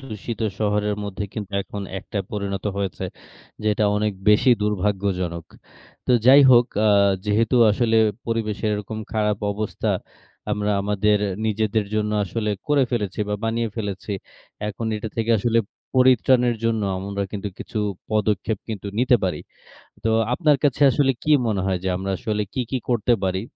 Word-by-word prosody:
দূষিত 115 -3 -7 0.2
শহরের 105 -1 0
মধ্যে 100 0 -4
কিন্তু 105 -2 -6
এখন 100 0 -7 0.2
একটা 100 - -5
পরিণত 100 -2 -3
হয়েছে, 95 -7 -3 0.6
যেটা 105 0 +2
অনেক 105 0 0 0.2
বেশি 105 +5 +5
দুর্ভাগ্যজনক। 95 -4 -1 0.6
তো 125 - +3
যাই 135 +2 +9
হোক, 120 -1 +6 0.2
আ - - +5 0.4
যেহেতু 110 +4 +2
আসলে 115 +1 +2 0.3
পরিবেশের 110 -2 -1
এরকম 105 +1 -5
খারাপ 105 -1 +1
অবস্থা, 105 +1 -2 0.6
আমরা 105 0 -1
আমাদের 105 +1 +2 0.3
নিজেদের 110 0 0
জন্য 105 0 0
আসলে 105 +3 -2 0.2
করে 145 -3 +4
ফেলেছি, 105 -4 -2
বা 105 - 0
বানিয়ে 115 0 0
ফেলেছি, 100 -1 -4 0.6
এখন 110 +2 -4
এটা 110 +1 -5
থেকে 115 +1 0
আসলে 115 +1 +2 0.4
পরিত্রাণের 125 -1 +4
জন্য 115 -2 +1 0.2
আমরা 100 +1 -3
কিন্তু 105 0 -4
কিছু - - -5 0.3
পদক্ষেপ 105 0 0
কিন্তু 105 -2 -5
নিতে 125 0 +4
পারি। 90 -5 -1 0.6
তো 110 - +1 0.2
আপনার 145 +2 +3
কাছে 145 0 +1
আসলে 135 +2 +3
কি 155 - +1 0.2
মনে 105 -4 0
হয় 95 -2 0
যে, 95 - 0
আমরা 95 +1 -3
আসলে 110 -4 -2
কি 130 - -1
কি 130 - +1
করতে 120 0 +2
পারি? 95 0 0
105 Hz, 150 wpm, -23 LUFS, 100-115 Hz, 0.6 s, যাই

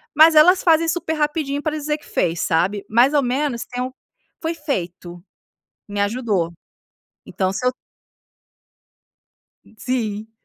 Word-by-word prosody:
mas 315 +2 +7
elas 360 +5 +6
fazem 330 -1 +4
super 325 -1 -1
rapidinho 295 -2 -1
pra 310 -1 -2
dizer 300 0 -2
que 300 - -20
fez, 165 0 -1
sabe? 190 +4 0
Mais 240 +6 +4
ao 290 - +4
menos 255 -1 -1
então 250 +1 -4 0.5
foi 325 0 -1
feito. 180 - -5 0.7
Me 205 0 -3
ajudou. 205 -5 0 0.7
Então 190 -1 -1
se 220 +6 -4
eu 250 - +2 1.9
Ih, - - -21
sim. 220 -4 -3
255 Hz, 130 wpm, -21 LUFS, 205-305 Hz, 1.9 s, mas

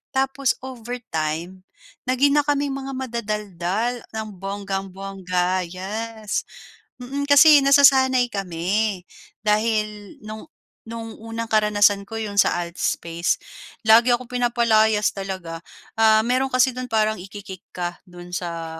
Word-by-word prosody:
Tapos 270 0 +1
overtime, 190 -8 -5 0.4
naging 280 +3 +3
na - - +2
kaming 285 -1 +1
mga 270 0 -5
madadaldal 215 -2 -3 0.2
ng 220 0 -3
bonggang-bongga, 195 -2 -3
yes, 210 +4 -4 0.5
mm. 275 +3 -3
Kasi 285 0 +7
nasasanay 265 -3 +5
kami, 195 +1 -1 0.4
dahil 210 -1 0
no'ng 215 0 -8 0.4
no'ng 225 -1 -7
unang 225 0 -5
karanasan 205 -2 +3
ko 225 0 -5
'yon 205 -2 -4
sa 175 -3 +3
alt 170 0 -6
space 170 -1 -1 0.5
lagi 235 +3 +7
akong 240 0 0
pinapalayas 230 -3 +2
talaga. 185 -4 -6 0.3
Ah, 220 -1 +5
mayro'n 260 +2 +1
kasi 255 0 +3
do'n 250 -1 -6
parang 215 -1 +2
iki-kick 190 0 -10
ka 175 -1 -4
do'n 175 -1 -10
sa 165 -2 -5
215 Hz, 120 wpm, -22 LUFS, 190-245 Hz, 0.5 s, Kasi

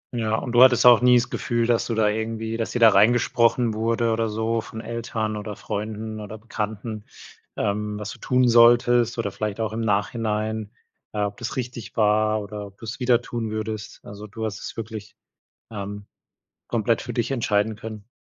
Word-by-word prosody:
Ja. 110 -2 0
Und 120 +2 -3
du 120 +1 +5
hattest 130 -1 +6
auch 120 -1 +8
nie 125 0 +6
das 120 +1 0
Gefühl, 120 -2 0
dass 120 -1 +1
du 115 - -2
da 110 -1 +3
irgendwie 110 +1 -2
dass 115 - -2
dir - - -2
da 115 -1 +8
reingesprochen 115 +2 +3
wurde 115 +1 0
oder 115 0 0
so 110 +1 -1
von 110 - -9
Eltern 115 -2 -3
oder 105 0 -6
Freunden 110 +1 -5
oder 105 +1 -8
Bekannten, 110 0 -5 0.5
ähm, 105 +1 -1
was 105 0 -5
du - - -11
tun 125 -1 +2
solltest 120 0 +5
oder 115 - -2
vielleicht 105 0 -4
auch 110 -1 -2
im 115 - -3
Nachhinein, 110 0 -1 0.4
äh, 105 - -2
ob 100 0 -3
das 120 - -5
richtig 120 -4 -6
war 110 0 +3
oder 105 0 -7
ob 100 0 -18
du 115 - -10
es 110 +5 -6
wieder 125 -1 +3
tun 115 -3 -4
würdest? 110 -1 -5
Also, 100 +1 -9
du 110 +2 -5
hast 100 -4 -4
es - - -8
wirklich, 110 -2 -7 0.6
ähm, 100 -1 -6 0.6
komplett 115 0 +1
für - - -6
dich 120 +1 -1
entscheiden 110 -3 +1
können? 110 -1 -9
110 Hz, 190 wpm, -24 LUFS, 105-115 Hz, 0.6 s, auch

